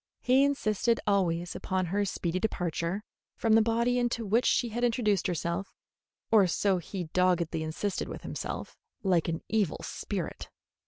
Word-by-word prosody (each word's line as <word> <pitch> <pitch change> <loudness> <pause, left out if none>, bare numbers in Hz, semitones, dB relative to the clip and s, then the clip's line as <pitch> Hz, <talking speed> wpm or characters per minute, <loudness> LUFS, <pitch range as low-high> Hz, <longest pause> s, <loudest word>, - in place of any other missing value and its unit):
He 260 +2 +5
insisted 235 -5 +1
always 175 -4 +1
upon 185 -1 -1
her 200 +4 0
speedy 185 -2 -2
departure 180 -1 -2 0.3
from 225 -1 +2
the 225 - +7
body 235 +2 +2
into 240 -2 -1
which 225 +5 +2
she 240 - +2
had 240 +2 -3
intruded 225 -6 +2
herself 175 +2 -3 0.6
or 210 -4 +6
so 190 +2 +1
he 180 +2 -5
doggedly 175 -3 +2
insisted 170 +5 -2
with - - -7
himself - - -5 0.2
like 180 -4 +2
an 165 -1 -2
evil 210 -7 +1
spirit. - - -5
200 Hz, 150 wpm, -29 LUFS, 175-225 Hz, 0.6 s, the